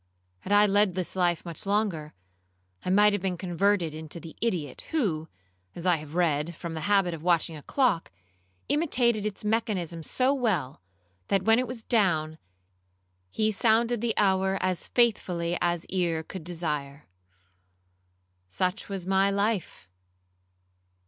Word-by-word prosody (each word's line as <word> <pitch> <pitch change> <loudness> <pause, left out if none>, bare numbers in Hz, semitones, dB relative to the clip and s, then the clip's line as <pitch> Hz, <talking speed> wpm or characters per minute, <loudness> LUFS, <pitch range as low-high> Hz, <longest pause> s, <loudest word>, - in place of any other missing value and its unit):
Had 190 - -8
I 205 0 +6
led 205 -2 +2
this 185 -1 -3
life 175 -2 +1
much 170 -2 -6
longer, 195 -7 -1 0.7
I - - -3
might 205 +2 +5
have 205 - -1
been 185 -2 -2
converted 180 -1 +1
into 155 +1 -7
the 165 -1 -11
idiot, 175 - -2
who, 180 - -1 0.5
as 170 - -7
I 180 -2 +4
have 155 +1 -10
read, 165 -2 +1
from 170 +1 -6
the 160 - -4
habit 195 -4 +3
of 160 - -7
watching 170 -1 +1
a 150 - -9
clock, 240 - +1 0.6
imitated 245 -8 +2
its 210 0 -4
mechanism 200 -7 -1
so 255 - +1
well, 205 - -1 0.5
that 195 -1 +1
when 225 +3 +4
it 255 - -1
was 235 -1 -7
down, 160 -9 +1 0.9
he 215 - 0
sounded 230 +2 +2
the 235 -2 -1
hour 190 -1 +2
as 185 -1 -1
faithfully 180 -8 +1
as 175 -1 0
ear 170 -4 -1
could 185 +1 -8
desire. 150 -4 -4 1.4
Such 185 - -2
was 195 -3 -4
my 195 +1 +3
life. 200 - -1
185 Hz, 145 wpm, -27 LUFS, 165-210 Hz, 1.4 s, I